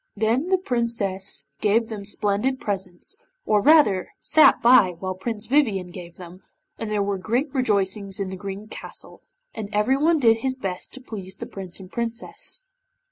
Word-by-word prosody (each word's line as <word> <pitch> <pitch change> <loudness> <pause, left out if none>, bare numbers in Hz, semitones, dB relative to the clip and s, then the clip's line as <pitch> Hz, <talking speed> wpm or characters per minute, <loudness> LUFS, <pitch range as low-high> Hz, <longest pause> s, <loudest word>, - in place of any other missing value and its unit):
Then 225 - +1
the 375 0 +3
Princess 230 - -2
gave 225 +2 +2
them 210 -3 -6
splendid 210 +6 0
presents, 190 - -4 0.3
or 210 -1 +3
rather 250 - +4
sat 310 - +5
by 220 -7 +6
while 185 +2 -3
Prince 210 +3 -5
Vivien 215 -9 +1
gave 175 -1 -10
them, 180 +1 -11 0.4
and 225 - -3
there 210 -1 +1
were 200 -1 -2
great 245 +9 -1
rejoicings 200 -6 0
in 195 -1 -3
the - - -4
Green 200 +2 -7
Castle, - - -9 0.3
and 210 -2 -5
everyone 270 +10 +3
did 230 -5 +4
his 260 +3 -1
best 190 -6 -4
to 260 - -9
please 195 -6 -7
the - - -7
Prince 190 -2 -5
and 185 -1 -12
Princess. 235 - -2
210 Hz, 165 wpm, -24 LUFS, 190-245 Hz, 0.4 s, by